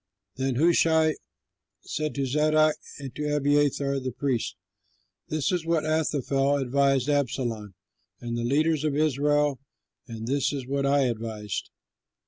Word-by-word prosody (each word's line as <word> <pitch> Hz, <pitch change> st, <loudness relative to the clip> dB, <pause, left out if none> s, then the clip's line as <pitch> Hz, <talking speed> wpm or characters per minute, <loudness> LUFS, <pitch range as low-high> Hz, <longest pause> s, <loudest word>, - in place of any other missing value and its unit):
Then 130 Hz, -1 st, -1 dB
Hushai 160 Hz, +1 st, +4 dB, 0.7 s
said 155 Hz, 0 st, -3 dB
to 140 Hz, -1 st, 0 dB
Zadok 155 Hz, +3 st, +3 dB, 0.2 s
and 135 Hz, -3 st, -8 dB
to 150 Hz, 0 st, -1 dB
Abiathar 145 Hz, -1 st, +2 dB
the 130 Hz, -1 st, -4 dB
priests, 130 Hz, -2 st, -2 dB, 0.7 s
"This 155 Hz, +4 st, -1 dB
is 180 Hz, -3 st, 0 dB
what 165 Hz, -2 st, 0 dB
Ahithophel 145 Hz, -3 st, +1 dB
advised 135 Hz, 0 st, +2 dB
Absalom 120 Hz, -8 st, -1 dB, 0.4 s
and 120 Hz, -1 st, -4 dB
the 120 Hz, -, -2 dB
leaders 155 Hz, +4 st, +1 dB
of 150 Hz, -2 st, 0 dB
Israel; 145 Hz, -1 st, +2 dB, 0.5 s
and 115 Hz, -2 st, -7 dB
this 140 Hz, +3 st, 0 dB
is 135 Hz, -3 st, -4 dB
what 140 Hz, +1 st, -1 dB
I 140 Hz, 0 st, +3 dB
advised. 110 Hz, -5 st, -3 dB
140 Hz, 130 wpm, -26 LUFS, 130-150 Hz, 0.7 s, Hushai